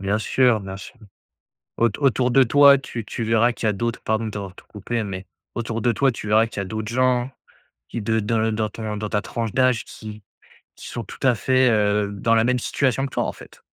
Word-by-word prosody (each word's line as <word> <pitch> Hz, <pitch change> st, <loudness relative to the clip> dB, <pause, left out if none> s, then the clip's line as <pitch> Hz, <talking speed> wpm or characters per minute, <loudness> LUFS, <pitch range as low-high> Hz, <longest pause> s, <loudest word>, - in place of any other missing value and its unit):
Bien 100 Hz, +2 st, 0 dB
sûr, 120 Hz, 0 st, +2 dB
bien 95 Hz, -1 st, -7 dB
sûr. 100 Hz, +6 st, -11 dB, 0.8 s
Aut 115 Hz, -, +3 dB
autour 130 Hz, -3 st, +2 dB
de 135 Hz, +2 st, +5 dB
toi, 140 Hz, +2 st, +6 dB
tu 120 Hz, -4 st, -6 dB
tu 115 Hz, +2 st, -4 dB
verras 115 Hz, +2 st, +3 dB
qu'il 115 Hz, -, -4 dB
y 110 Hz, -, +4 dB
a -, -, 0 dB
d'autres 115 Hz, +4 st, -3 dB
pardon 110 Hz, +1 st, -1 dB
de -, -, -3 dB
t'avoir 100 Hz, -3 st, -6 dB
tout -, -, -16 dB
coupé 110 Hz, +3 st, -3 dB
mais 95 Hz, -1 st, -6 dB, 0.3 s
autour 115 Hz, -1 st, -3 dB
de 120 Hz, -, +3 dB
toi, 135 Hz, +4 st, +2 dB
tu 105 Hz, -, -7 dB
verras 110 Hz, +2 st, +4 dB
qu'il 110 Hz, -, -9 dB
y -, -, -1 dB
a -, -, -4 dB
d'autres 110 Hz, +2 st, -5 dB
gens 125 Hz, 0 st, +1 dB, 0.6 s
qui, 115 Hz, -, -4 dB
de 110 Hz, +1 st, +1 dB
dans 110 Hz, +2 st, 0 dB
le 110 Hz, 0 st, +1 dB
dans 110 Hz, 0 st, -1 dB
ton 105 Hz, 0 st, -5 dB
dans 105 Hz, 0 st, -4 dB
ta 105 Hz, 0 st, -1 dB
tranche 115 Hz, -3 st, -4 dB
d'âge, 130 Hz, -3 st, +2 dB
qui 110 Hz, -1 st, -10 dB, 0.5 s
qui -, -, -10 dB
sont, -, -, -5 dB
tout -, -, -12 dB
à 130 Hz, -2 st, +4 dB
fait, 130 Hz, +2 st, +3 dB
heu, 105 Hz, -1 st, +1 dB
dans 115 Hz, +3 st, +1 dB
la 115 Hz, -, +3 dB
même 125 Hz, +1 st, +2 dB
situation 135 Hz, +2 st, 0 dB
que 135 Hz, -, -9 dB
toi, -, -, 0 dB
en -, -, -3 dB
fait. -, -, -15 dB
115 Hz, 245 wpm, -22 LUFS, 105-125 Hz, 0.8 s, toi